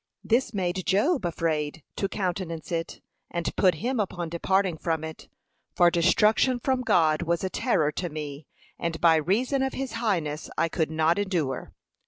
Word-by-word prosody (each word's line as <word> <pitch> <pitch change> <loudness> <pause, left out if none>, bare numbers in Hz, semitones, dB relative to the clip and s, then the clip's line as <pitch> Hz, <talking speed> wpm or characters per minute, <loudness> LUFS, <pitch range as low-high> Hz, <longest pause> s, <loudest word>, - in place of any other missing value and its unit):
This 235 +1 +1
made 185 -3 -2
Job 215 - +2
afraid 160 -2 -2
to 195 - -1
countenance 180 -5 -3
it, 165 -1 -3 0.3
and 170 -1 -3
put 185 -4 +4
him 245 - -2
upon 175 -4 -2
departing 180 0 0
from 160 -2 -1
it; 160 0 -8 0.5
'For 175 0 +5
destruction 210 +9 +3
from 260 +1 0
God 160 -9 +3
was 170 +1 0
a 190 - -2
terror 155 - +1
to 175 +3 -3
me, 150 -1 -7 0.3
and 170 -1 -2
by 165 -2 +5
reason 230 - +1
of 265 0 0
his 265 -2 -4
highness 175 -10 -1
I 165 +1 +2
could 160 -1 -1
not 160 +3 +2
endure.' 170 -10 -2
175 Hz, 165 wpm, -26 LUFS, 160-205 Hz, 0.5 s, For